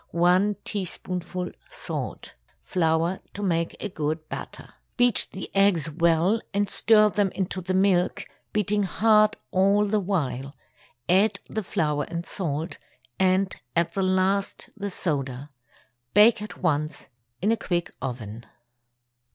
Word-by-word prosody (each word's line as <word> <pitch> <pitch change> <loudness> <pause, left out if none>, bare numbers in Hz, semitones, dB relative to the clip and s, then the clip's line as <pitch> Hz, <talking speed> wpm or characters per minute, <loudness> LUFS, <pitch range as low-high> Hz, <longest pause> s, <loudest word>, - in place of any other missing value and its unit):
1 180 +4 +3
teaspoonful 180 -2 -4 0.2
salt. - - -6 0.3
Flour 165 +1 +1 0.2
to 205 - -4
make 170 -3 0 0.2
good 155 +1 -2
batter. - - -8 0.2
Beat 245 -4 +3
the 190 - -8
eggs 185 -6 +3
well 170 +6 +2
and 205 0 +2
stir 215 +1 +4
them 200 -2 +1
into 185 -1 -2
the 185 +1 -2
milk, 185 -2 +2 0.3
beating 210 0 +1
hard 215 +2 +3
all 200 +2 +3
the 210 +1 +1
while; 145 -8 -2 0.5
add 195 +5 +3
the 220 - -3
flour 150 -6 -1
and 170 0 -4
salt, 160 -2 -3 0.4
and 190 0 +2 0.2
at 170 0 +1
the 195 - -1
last 190 +1 0
the 200 0 -4
soda. 140 -6 -3 0.6
Bake 215 +1 +6
at 210 - -7
once 155 -3 -1 0.3
in 210 +4 +2
a - - +4
quick 175 -5 -2
oven. 115 -3 -6
185 Hz, 125 wpm, -25 LUFS, 165-205 Hz, 0.6 s, Bake